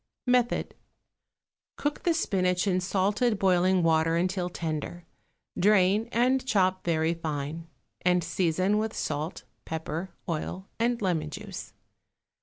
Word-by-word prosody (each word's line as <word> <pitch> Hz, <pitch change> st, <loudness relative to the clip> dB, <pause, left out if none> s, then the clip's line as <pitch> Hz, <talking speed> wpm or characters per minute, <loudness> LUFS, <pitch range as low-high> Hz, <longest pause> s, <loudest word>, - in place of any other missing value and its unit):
Method. 250 Hz, -1 st, +1 dB, 1.0 s
Cook 290 Hz, 0 st, -2 dB
the 340 Hz, -2 st, +2 dB
spinach 185 Hz, -, +1 dB
in 185 Hz, -2 st, +1 dB
salted 205 Hz, +5 st, +1 dB
boiling 185 Hz, -1 st, +3 dB
water 165 Hz, 0 st, +3 dB
until 180 Hz, +1 st, 0 dB
tender; 165 Hz, 0 st, -4 dB, 0.5 s
drain, 205 Hz, +3 st, +3 dB
and 255 Hz, +3 st, +2 dB
chop 190 Hz, -6 st, +1 dB
very 165 Hz, -1 st, +1 dB
fine, 160 Hz, 0 st, -4 dB, 0.3 s
and 180 Hz, -1 st, +3 dB
season 185 Hz, +5 st, +1 dB
with 220 Hz, +1 st, -2 dB
salt, 155 Hz, +4 st, -3 dB, 0.2 s
pepper, 160 Hz, +3 st, -4 dB, 0.2 s
oil 175 Hz, +4 st, -4 dB
and 235 Hz, +1 st, +1 dB
lemon 165 Hz, -5 st, 0 dB
juice. 195 Hz, -, -8 dB
185 Hz, 115 wpm, -28 LUFS, 165-205 Hz, 1.0 s, boiling